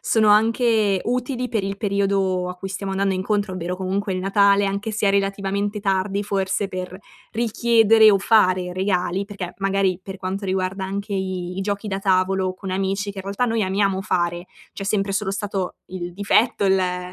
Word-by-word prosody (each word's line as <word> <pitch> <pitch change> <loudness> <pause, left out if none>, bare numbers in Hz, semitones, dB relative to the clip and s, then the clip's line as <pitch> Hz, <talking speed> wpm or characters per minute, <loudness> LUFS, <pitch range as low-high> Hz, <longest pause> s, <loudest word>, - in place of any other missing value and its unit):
sono 220 -2 +2
anche 220 -2 +3
utili 250 +1 -2
per 215 -4 -1
il 195 0 -4
periodo 195 -3 0
a - - -6
cui 195 - -6
stiamo 195 0 -4
andando 195 0 0
incontro, 200 0 -1
ovvero 180 0 -4
comunque 190 +2 -2
il 185 - -2
Natale 200 +1 +3
anche 200 +3 -3
se 210 -1 +1
è - - +4
relativamente 200 +1 -1
tardi 195 0 0
forse 195 0 -1
per 185 -1 -6 0.4
richiedere 225 -1 +4
o 195 - +4
fare 185 -4 +3
regali, 185 0 0
perché 195 -4 -7
magari 195 -2 +1
per 190 +1 -8
quanto 195 +2 -4
riguarda 190 0 -2
anche 200 +2 -4
i 190 -1 -2 0.2
i - - -2
giochi 205 +1 -3
da 195 0 -2
tavolo 190 -1 +1
con 185 0 -7
amici, 195 +2 -1
che 200 - -10
i - - -2
realtà 200 +5 -1
noi 225 -2 0
amiamo 195 0 +1
fare, 175 -2 -1 0.3
c'è 195 - -5
sempre 195 -1 0
solo 195 0 -1
stato 195 -2 -3
il 175 -1 -6
difetto, 205 +3 +2
il 190 0 +4
ehm, 180 -1 -2
195 Hz, 185 wpm, -22 LUFS, 185-205 Hz, 0.4 s, è